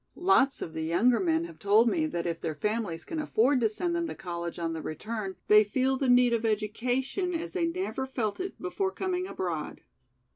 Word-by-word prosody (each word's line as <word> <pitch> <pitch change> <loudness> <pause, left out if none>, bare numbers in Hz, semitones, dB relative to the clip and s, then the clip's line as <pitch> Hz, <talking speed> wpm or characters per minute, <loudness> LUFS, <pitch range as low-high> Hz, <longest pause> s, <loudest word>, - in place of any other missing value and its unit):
Lots 345 -7 +3
of 160 - -7
the 160 - -4
younger 180 +10 +3
men 325 -2 +1
have 335 -1 -9
told 215 +3 +4
me 315 +6 +1
that 170 - -3
if 170 -1 -3
their 160 -2 -3
families 210 -2 -2
can 325 - -4
afford 265 -3 +2
to 220 - +3
send 340 +11 -2
them 340 0 -1
to - - -6
college 170 -1 -5
on 165 -1 -2
their 160 - -4
return 200 +4 -5
they 210 0 +7
feel 260 +6 +1
the 265 -1 0
need 245 -1 +5
of 230 -1 0
education 245 - -1
as 330 +1 -4
they 345 -3 +1
never 335 -6 -3
felt 230 -6 -2
it 375 +1 -5
before 370 +2 -1
coming 370 -1 -2
abroad." 170 - -4
240 Hz, 210 wpm, -28 LUFS, 200-330 Hz, -, they